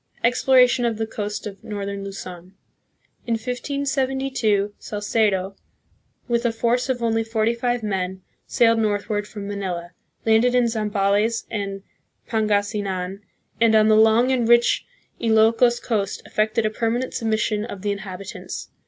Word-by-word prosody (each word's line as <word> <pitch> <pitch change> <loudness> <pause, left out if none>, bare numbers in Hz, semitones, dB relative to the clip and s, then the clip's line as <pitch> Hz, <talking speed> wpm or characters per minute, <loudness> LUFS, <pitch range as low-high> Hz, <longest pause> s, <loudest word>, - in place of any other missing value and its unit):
Exploration 250 +1 +4
of 230 -2 0
the 220 - -1
Coast 210 -1 -5
of 200 -2 -8
Northern 200 -1 -5
Luzon. 185 -2 -8 0.7
In 235 - +1
1572, 260 -3 -1
Salcedo, 205 -2 0 0.7
with 235 -1 +1
a 235 - +2
force 235 +3 0
of 245 -2 -1
only 225 -1 +1
forty 225 0 0
five 240 0 -1
men, 190 -2 -3 0.2
sailed 230 -1 +3
north 205 -2 0
ward 205 -1 -1
from 205 -2 -7
Manila, 185 -4 -4 0.3
landed 225 +3 +4
in 245 -1 +4
Zambales 215 0 0
and 195 -2 -4 0.4
Pangasinan, 205 -3 -1 0.4
and 230 -1 +4
on 215 0 +5
the 215 - +6
long 225 +4 +5
and 240 -3 +1
rich 240 0 +4 0.3
Ilokos 230 +2 +4
coast 205 -5 -2
effected 215 +1 0
a 215 - +1
permanent 235 +3 -1
submission 220 -2 0
of 205 -4 -7
the 205 - 0
inhabitants. 195 -1 -7
220 Hz, 135 wpm, -22 LUFS, 200-235 Hz, 0.7 s, the